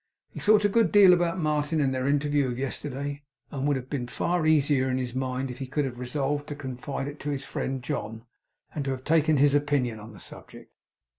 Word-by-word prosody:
He -, -, -8 dB
thought 210 Hz, 0 st, +4 dB
a -, -, +7 dB
good 225 Hz, +2 st, +2 dB
deal 200 Hz, -3 st, +8 dB
about 175 Hz, 0 st, +1 dB
Martin, 155 Hz, -1 st, 0 dB
and 135 Hz, -2 st, +1 dB
their 130 Hz, 0 st, -1 dB
interview 145 Hz, -1 st, +2 dB
of 120 Hz, -1 st, -3 dB
yesterday, 140 Hz, +1 st, -4 dB, 0.3 s
and 140 Hz, 0 st, -2 dB
would 145 Hz, -2 st, +2 dB
have 130 Hz, -1 st, -7 dB
been 130 Hz, -3 st, -3 dB
far 170 Hz, +5 st, 0 dB
easier 145 Hz, -4 st, +3 dB
in 130 Hz, -, 0 dB
his 125 Hz, -2 st, -3 dB
mind 130 Hz, 0 st, -2 dB
if 125 Hz, -, -9 dB
he 135 Hz, -, -4 dB
could 140 Hz, +2 st, -1 dB
have 120 Hz, -2 st, -6 dB
resolved 145 Hz, +3 st, -2 dB
to 145 Hz, -, -5 dB
confide 135 Hz, 0 st, -5 dB
it 145 Hz, +1 st, -7 dB
to 150 Hz, -, -4 dB
his 140 Hz, -1 st, -3 dB
friend 130 Hz, -2 st, -3 dB
John, 110 Hz, -2 st, -4 dB, 0.5 s
and 150 Hz, -, -2 dB
to -, -, -1 dB
have 130 Hz, -1 st, -3 dB
taken 155 Hz, 0 st, +3 dB
his 140 Hz, +1 st, +4 dB
opinion 145 Hz, -6 st, +1 dB
on 110 Hz, +2 st, -10 dB
the 105 Hz, -, -13 dB
subject. -, -, -10 dB
140 Hz, 225 wpm, -27 LUFS, 130-150 Hz, 0.5 s, deal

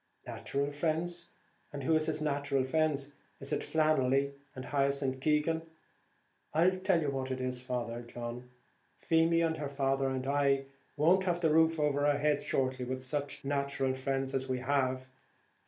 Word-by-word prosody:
"Nathural 140 Hz, +1 st, -2 dB
friends! 170 Hz, +3 st, -2 dB, 0.4 s
and 145 Hz, -2 st, -6 dB
who 160 Hz, +5 st, +3 dB
is 155 Hz, 0 st, +2 dB
his 155 Hz, -1 st, -1 dB
nathural 140 Hz, -2 st, 0 dB
friends! 145 Hz, -1 st, 0 dB, 0.3 s
Is 135 Hz, -, -4 dB
it -, -, 0 dB
Flannelly, 140 Hz, -3 st, +2 dB, 0.2 s
and 130 Hz, 0 st, -6 dB
Hyacinth 140 Hz, -1 st, 0 dB
Keegan? 155 Hz, +3 st, +1 dB, 0.9 s
I 170 Hz, +4 st, +5 dB
tell 185 Hz, -1 st, +1 dB
you 145 Hz, -, 0 dB
what 135 Hz, -1 st, -3 dB
it 130 Hz, 0 st, -2 dB
is, 125 Hz, -1 st, -3 dB
Father 120 Hz, -2 st, -3 dB
John, 120 Hz, +1 st, -7 dB, 0.5 s
Feemy 165 Hz, +1 st, +3 dB
and 160 Hz, -1 st, +1 dB
her 145 Hz, -2 st, -3 dB
father 135 Hz, -1 st, 0 dB
and 130 Hz, -1 st, -3 dB
I 140 Hz, -1 st, +2 dB, 0.3 s
won't 180 Hz, +6 st, +4 dB
have 175 Hz, -1 st, 0 dB
the 160 Hz, -3 st, +3 dB
roof 160 Hz, +1 st, +4 dB
over 145 Hz, -1 st, +2 dB
our 145 Hz, -1 st, +3 dB
heads 145 Hz, 0 st, +1 dB
shortly, 130 Hz, -2 st, 0 dB
with 130 Hz, +1 st, -4 dB
such 145 Hz, +1 st, -3 dB
nathural 140 Hz, -1 st, 0 dB
friends 135 Hz, 0 st, -2 dB
as 135 Hz, 0 st, -2 dB
we 130 Hz, -, 0 dB
have. 130 Hz, 0 st, 0 dB
140 Hz, 165 wpm, -32 LUFS, 130-155 Hz, 0.9 s, I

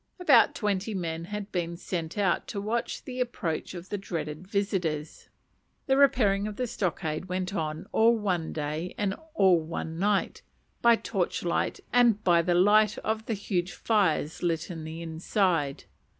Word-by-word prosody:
About 280 Hz, -10 st, +5 dB
twenty 205 Hz, 0 st, -1 dB
men 165 Hz, -2 st, -3 dB
had 210 Hz, +2 st, -6 dB
been 170 Hz, -1 st, -2 dB
sent 170 Hz, 0 st, -4 dB
out 195 Hz, -3 st, +1 dB
to 205 Hz, -, -4 dB
watch 225 Hz, +4 st, -2 dB
the 255 Hz, -1 st, -7 dB
approach 190 Hz, -9 st, -2 dB
of 175 Hz, +1 st, -9 dB
the 205 Hz, -, -3 dB
dreaded 160 Hz, -2 st, -5 dB
visitors. 180 Hz, -7 st, -2 dB, 0.6 s
The 265 Hz, -, +3 dB
repairing 215 Hz, -8 st, +3 dB
of 210 Hz, -, -5 dB
the 250 Hz, -, -1 dB
stockade 175 Hz, -7 st, -2 dB
went 185 Hz, +1 st, -3 dB
on 155 Hz, -4 st, -3 dB
all 230 Hz, +1 st, +4 dB
one 180 Hz, -6 st, -1 dB
day 155 Hz, +3 st, -4 dB
and 200 Hz, -2 st, 0 dB, 0.2 s
all 190 Hz, -, +5 dB
one 160 Hz, 0 st, -5 dB
night, 205 Hz, +1 st, +1 dB, 0.4 s
by 235 Hz, 0 st, +6 dB
torchlight 175 Hz, -5 st, -1 dB
and 235 Hz, -4 st, +4 dB
by 170 Hz, -2 st, +5 dB
the 175 Hz, +1 st, +1 dB
light 210 Hz, +4 st, +5 dB
of 220 Hz, 0 st, -2 dB
huge 195 Hz, -4 st, -2 dB
fires 185 Hz, -8 st, +1 dB
lit 170 Hz, 0 st, -1 dB
in 165 Hz, -2 st, -6 dB
the 160 Hz, +1 st, -6 dB
inside. 165 Hz, -3 st, 0 dB
185 Hz, 155 wpm, -28 LUFS, 165-210 Hz, 0.6 s, by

